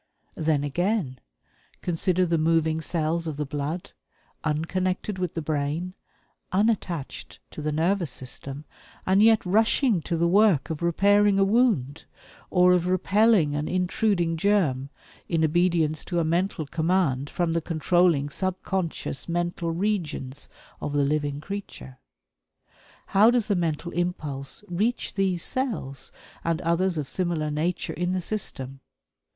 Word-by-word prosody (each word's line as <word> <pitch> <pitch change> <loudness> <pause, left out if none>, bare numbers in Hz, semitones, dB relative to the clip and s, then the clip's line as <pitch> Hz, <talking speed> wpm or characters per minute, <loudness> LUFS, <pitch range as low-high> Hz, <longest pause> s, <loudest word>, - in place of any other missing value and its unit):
Then, 155 -2 0
again, 165 - -1 0.6
consider 180 +1 +1
the 165 -2 +1
moving 160 0 +2
cells 165 +1 -1
of 155 -3 -4
the 150 - -2
blood, 150 +7 -4 0.5
unconnected 185 +5 -1
with 180 -3 -2
the 165 - -3
brain, 155 +4 -2 0.6
unattached 190 -7 -1
to - - -7
the 150 0 -1
nervous 170 +2 +1
system, 135 +3 -5 0.4
and 190 +2 +4
yet 220 -1 +5
rushing 220 - +3
to 170 +1 -2
the 170 +1 +2
work 190 -6 +3
of 160 - -4
repairing 200 +4 +3
a 195 - +4
wound, 195 - +1 0.4
or 180 -1 +5
of 180 -1 +1
repelling 190 -2 +3
an 150 +1 -2
intruding 180 -2 0
germ, 160 -9 +1 0.4
in 165 -2 +2
obedience 165 -1 +1
to 175 - -3
a - - +2
mental 170 0 0
command 160 -3 0
from 170 -2 -1
the 165 - 0
controlling 165 -2 +2
subconscious 185 -2 -3
mental 175 0 -1
regions 165 -7 -3 0.3
of 145 - -3
the 145 -1 +2
living 145 -1 -1
creature. 155 -7 -8 1.1
How 210 +4 +5
does 240 -3 +2
the 205 - +1
mental 170 -1 -2
impulse 155 -4 -3
reach 210 +8 -1
these 190 -3 0
cells 190 - -2 0.3
and 165 -1 0
others 175 +1 +1
of 145 -3 -2
similar 170 -4 -1
nature 160 +4 -2
in 180 +1 -1
the 185 - -1
system? 135 -9 -3
170 Hz, 135 wpm, -25 LUFS, 150-190 Hz, 1.1 s, yet